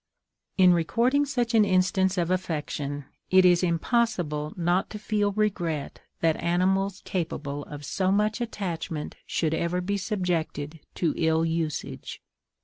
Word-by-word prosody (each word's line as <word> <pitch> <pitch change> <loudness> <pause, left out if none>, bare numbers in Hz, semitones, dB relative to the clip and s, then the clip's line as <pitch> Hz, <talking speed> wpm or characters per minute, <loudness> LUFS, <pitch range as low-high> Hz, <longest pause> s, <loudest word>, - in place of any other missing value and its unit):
In 185 -2 +7
recording 240 - +2
such 245 -3 -1
an 220 -2 +6
instance 190 0 +2
of 175 0 +1
affection, 150 -5 -2 0.2
it 185 0 +6
is 175 -1 +5
impossible 170 - 0
not 175 +2 +1
to 215 - -6
feel 210 -1 0
regret 175 -8 -1 0.2
that 160 -1 +2
animals 190 +3 +1
capable 145 -5 -3
of 145 -1 -8
so 185 +6 0
much 210 +4 +1
attachment 175 -9 -4
should 160 -2 0
ever 170 +2 0
be 200 +3 -1
subjected 170 -6 -2 0.2
to 165 -3 +1
ill 160 0 +2
usage. 160 -2 -3
180 Hz, 135 wpm, -26 LUFS, 160-200 Hz, 0.2 s, In